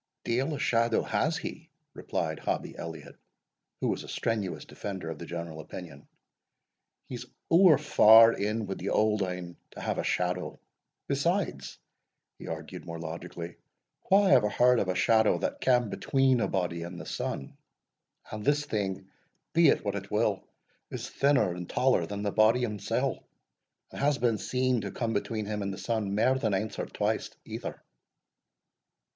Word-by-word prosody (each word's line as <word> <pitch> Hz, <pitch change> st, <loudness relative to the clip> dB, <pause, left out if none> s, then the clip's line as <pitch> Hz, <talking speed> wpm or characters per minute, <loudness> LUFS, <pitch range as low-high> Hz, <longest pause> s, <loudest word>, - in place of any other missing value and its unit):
"Deil 130 Hz, +6 st, 0 dB
a -, -, -6 dB
shadow 115 Hz, -1 st, +2 dB
has 150 Hz, +10 st, 0 dB
he," 165 Hz, -1 st, -7 dB, 0.2 s
replied -, -, -3 dB
Hobbie -, -, -3 dB
Elliot, 80 Hz, -1 st, -8 dB, 0.6 s
who -, -, +1 dB
was -, -, -2 dB
a -, -, -11 dB
strenuous 110 Hz, -5 st, -2 dB
defender 95 Hz, -5 st, -6 dB
of 80 Hz, -, -8 dB
the 85 Hz, -, -7 dB
general 85 Hz, -2 st, -6 dB
opinion; 80 Hz, -2 st, -9 dB, 1.0 s
"he's 125 Hz, -1 st, -7 dB, 0.2 s
ower 170 Hz, -3 st, +7 dB
far 115 Hz, -5 st, +7 dB
in 105 Hz, +2 st, -1 dB
wi' 95 Hz, -, -3 dB
the -, -, -4 dB
Auld 105 Hz, -1 st, +2 dB
Ane 90 Hz, -2 st, -4 dB
to -, -, -12 dB
have -, -, -2 dB
a -, -, -1 dB
shadow. 90 Hz, 0 st, -1 dB, 0.5 s
Besides," 140 Hz, -, -1 dB, 0.6 s
he -, -, -9 dB
argued -, -, -6 dB
more 85 Hz, -1 st, -6 dB
logically, 85 Hz, +1 st, -7 dB, 0.5 s
"wha 200 Hz, +2 st, +6 dB
ever 125 Hz, -, +5 dB
heard 125 Hz, +2 st, +4 dB
of 100 Hz, -, 0 dB
a 95 Hz, -, 0 dB
shadow 110 Hz, +3 st, +4 dB
that 285 Hz, 0 st, -3 dB
cam 125 Hz, -4 st, +3 dB
between 135 Hz, 0 st, +2 dB
a -, -, +1 dB
body 90 Hz, -3 st, -2 dB
and 85 Hz, +1 st, -7 dB
the -, -, -8 dB
sun? 70 Hz, -, -4 dB, 0.8 s
and 110 Hz, -1 st, -5 dB
this 145 Hz, +3 st, +2 dB
thing, 95 Hz, -7 st, -3 dB, 0.5 s
be 170 Hz, -1 st, +6 dB
it 140 Hz, -, +3 dB
what 100 Hz, -, 0 dB
it 100 Hz, 0 st, -5 dB
will, 105 Hz, -2 st, +1 dB, 0.5 s
is -, -, -5 dB
thinner 135 Hz, -9 st, +2 dB
and 90 Hz, -1 st, -7 dB
taller 125 Hz, -10 st, +2 dB
than 100 Hz, +3 st, -5 dB
the 100 Hz, -, 0 dB
body 110 Hz, +4 st, +4 dB
himsell, 105 Hz, -5 st, -1 dB, 0.7 s
and -, -, -7 dB
has 145 Hz, 0 st, +3 dB
been 115 Hz, -5 st, +1 dB
seen 125 Hz, 0 st, 0 dB
to 100 Hz, -, -4 dB
come 115 Hz, +3 st, -2 dB
between 110 Hz, 0 st, -2 dB
him 105 Hz, 0 st, -3 dB
and 100 Hz, 0 st, -2 dB
the 95 Hz, -, -6 dB
sun 110 Hz, -4 st, -2 dB
mair 125 Hz, +5 st, +3 dB
than 110 Hz, -5 st, +1 dB
anes 105 Hz, +3 st, -3 dB
or -, -, -2 dB
twice -, -, -1 dB, 0.2 s
either." -, -, -6 dB
110 Hz, 165 wpm, -29 LUFS, 90-125 Hz, 1.0 s, ower